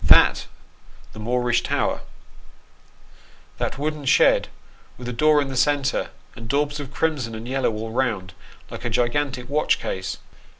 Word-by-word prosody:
That - - +6 0.7
the 110 - -10
Moorish 120 +2 +1
tower - - 0 1.6
that - - -2
wooden 150 0 -3
shed 130 - +5 0.5
with 125 - -8
a 125 - -3
door 150 +5 +4
in 135 - -6
the 135 - -5
centre, 140 +1 +1 0.3
and 115 -2 -9
daubs 145 +2 0
of 140 -2 -7
crimson 140 -7 -1
and 110 +2 -7
yellow 135 -1 +1
all 110 +1 -5
round, 110 -7 -1 0.4
like - - -7
a 120 - -1
gigantic 125 +2 0
watch 150 +2 +2
case 95 0 -4
125 Hz, 145 wpm, -23 LUFS, 115-145 Hz, 1.6 s, That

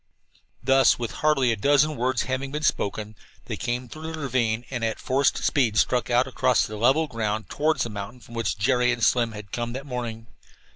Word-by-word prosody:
Thus, 135 +1 +5
with 120 -2 -4
hardly 135 -5 +3
a - - +1
dozen 145 +7 +3
words 125 -1 0
having 130 +1 -3
been 150 +1 -4
spoken, 105 -2 -1 0.3
they - - -4
came 120 +1 -3
through 155 +5 -7
the 160 - -6
ravine 120 -4 0
and 120 -3 -3
at 110 -1 -1
forced 135 +1 +1
speed 120 -7 +2
struck 125 +1 +2
out 120 +1 +3
across 130 -2 +2
the 110 - -7
level 130 +9 +3
ground 110 -5 -3
toward 155 +2 +1
the 120 - -1
mountain 105 +4 -7
from 120 0 -15
which 115 -3 -1
Jerry 125 +3 +2
and 120 -2 -2
Slim 120 -2 +3
had 105 -2 -10
come 120 0 -3
that 135 +2 -6
morning. 120 -4 -5
125 Hz, 200 wpm, -25 LUFS, 115-135 Hz, 0.3 s, Thus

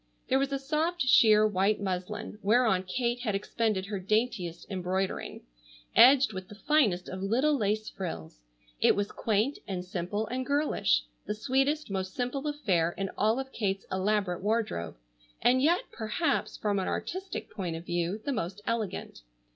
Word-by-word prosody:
There 265 0 +4
was 275 0 0
a 275 - 0
soft 310 +4 0
sheer 215 -4 +6
white 205 0 +2
muslin, 200 +3 -4
whereon 220 -2 +3
Kate 240 +4 -1
had 220 -5 -1
expended 210 -1 -1
her 200 -1 -4
daintiest 200 -4 -1
embroidering, 190 0 -3 0.5
edged 260 -2 +7
with 185 0 -6
the 205 - -11
finest 220 -8 +2
of 185 0 -6
little 255 +10 +2
lace 215 -2 0
frills. 80 - -6 0.4
It - - +5
was 205 0 -1
quaint 220 +6 0
and 180 -2 -4
simple 185 +3 -2
and 255 +3 -3
girlish, 285 +3 +1 0.2
the 210 - -1
sweetest, 270 +4 0
most 190 -1 -3
simple 260 +4 -2
affair 185 - 0
in 195 -1 -2
all 220 +4 +2
of 265 0 -5
Kate's 195 -5 -2
elaborate 190 -1 0
wardrobe, 205 - -1 0.4
and 255 +1 +4
yet, 335 +6 +4
perhaps, 225 +10 -1
from 205 -2 0
an 190 - -2
artistic 380 +2 -4
point 180 -5 -4
of 165 +1 -7
view, 175 +4 -1
the 280 - 0
most 190 -3 -3
elegant. 225 - -3
215 Hz, 160 wpm, -29 LUFS, 190-255 Hz, 0.5 s, edged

